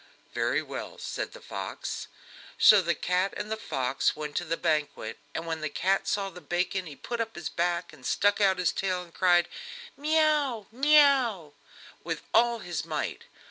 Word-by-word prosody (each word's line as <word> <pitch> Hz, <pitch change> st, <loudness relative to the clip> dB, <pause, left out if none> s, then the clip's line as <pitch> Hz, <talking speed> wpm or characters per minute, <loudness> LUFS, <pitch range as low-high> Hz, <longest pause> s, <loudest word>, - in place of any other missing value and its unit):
"Very -, -, +1 dB
well," -, -, -7 dB
said -, -, -4 dB
the -, -, -10 dB
fox. 475 Hz, -, -5 dB, 0.5 s
So 210 Hz, -2 st, +8 dB
the 170 Hz, -2 st, 0 dB
cat 180 Hz, +4 st, 0 dB
and 210 Hz, +1 st, -5 dB
the -, -, +1 dB
fox 135 Hz, -, -1 dB
went 150 Hz, -1 st, -6 dB
to -, -, 0 dB
the 165 Hz, +1 st, -1 dB
banquet, 150 Hz, -8 st, -1 dB, 0.2 s
and 165 Hz, -, -3 dB
when 160 Hz, -1 st, -3 dB
the 155 Hz, -, -2 dB
cat 190 Hz, +6 st, 0 dB
saw 195 Hz, -1 st, -1 dB
the 180 Hz, -, -11 dB
bacon 180 Hz, +1 st, -1 dB
he 150 Hz, -, -9 dB
put 235 Hz, +8 st, -4 dB
up 225 Hz, 0 st, -4 dB
his 170 Hz, -4 st, -4 dB
back 175 Hz, 0 st, -1 dB
and 130 Hz, -, -16 dB
stuck 205 Hz, +9 st, +2 dB
out 190 Hz, -2 st, +4 dB
his 180 Hz, -1 st, +2 dB
tail, 185 Hz, -2 st, -1 dB
and 170 Hz, -1 st, -17 dB
cried: 175 Hz, -2 st, +4 dB, 0.5 s
"Mee 310 Hz, +3 st, +1 dB
oo, 290 Hz, -8 st, +2 dB
mee 295 Hz, +6 st, +5 dB
oo!" 235 Hz, -, +2 dB, 0.5 s
with -, -, -4 dB
all 235 Hz, +1 st, +4 dB
his 175 Hz, -9 st, -4 dB
might. 155 Hz, -2 st, -4 dB
185 Hz, 185 wpm, -28 LUFS, 165-225 Hz, 0.5 s, So